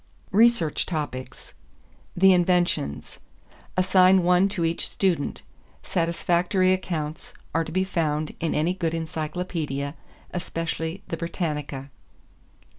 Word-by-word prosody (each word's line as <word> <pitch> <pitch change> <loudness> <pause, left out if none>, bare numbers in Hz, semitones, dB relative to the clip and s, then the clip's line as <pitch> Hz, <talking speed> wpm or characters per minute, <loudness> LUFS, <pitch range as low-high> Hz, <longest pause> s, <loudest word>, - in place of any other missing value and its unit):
=Research 210 -7 +3
Topics= 130 -6 -5 0.6
=The 190 +1 +7
Inventions.= 175 - +1 0.6
Assign 185 0 +5
one 180 +2 +4
to 185 -4 -1
each 165 +1 0
student. 180 -7 0 0.4
Satisfactory 175 +2 +1
accounts 160 -5 -4 0.2
are 165 - +2
to 160 - -8
be 185 +3 +1
found 155 -5 -1
in 165 -2 -1
any 160 +4 +1
good 165 -3 -2
encyclopedia, 155 -3 -3 0.4
especially 165 +1 -3
the 165 - -2
Britannica. 150 -5 -4
170 Hz, 105 wpm, -25 LUFS, 155-185 Hz, 0.6 s, =The